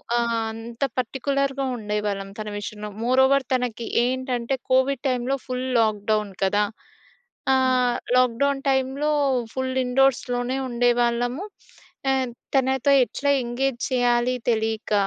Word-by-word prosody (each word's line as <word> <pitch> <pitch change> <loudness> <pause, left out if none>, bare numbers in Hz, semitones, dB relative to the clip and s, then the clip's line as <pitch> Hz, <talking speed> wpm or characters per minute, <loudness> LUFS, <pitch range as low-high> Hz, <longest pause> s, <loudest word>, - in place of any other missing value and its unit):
ఆహ్, 235 -1 +1 0.2
అంత 230 +1 -9 0.2
పార్టిక్యులర్‌గా 275 +2 -1
ఉండేవాళ్ళం 210 -2 -3
తన 215 0 -4
విషయంలో. 210 0 -6
మోరోవర్ 265 +2 +4
తనకి 245 -2 -1 0.2
ఏంటంటే 255 0 -1 0.2
కోవిడ్ 260 0 +2
టైమ్‌లో 255 +1 0
ఫుల్ 255 0 -3
లాక్డౌన్ 215 -1 +1
కదా! 205 +2 +2 0.9
ఆ! - - +5 0.6
లాక్డౌన్ 255 +3 +2
టైమ్‌లో 270 +3 +1 0.4
ఫుల్ 260 0 -2
ఇండోర్‌స్‌లోనే 250 -1 +1
ఉండేవాళ్ళము. 245 +5 +1 0.7
ఆహ్, 265 -1 +1 0.3
తనతో 265 +1 +3
ఎట్లా 285 +3 -1
ఎంగేజ్ 240 +1 -1
చేయాలి 245 0 +2 0.2
తెలియక 220 -1 -1
245 Hz, 105 wpm, -24 LUFS, 230-265 Hz, 0.9 s, ఆ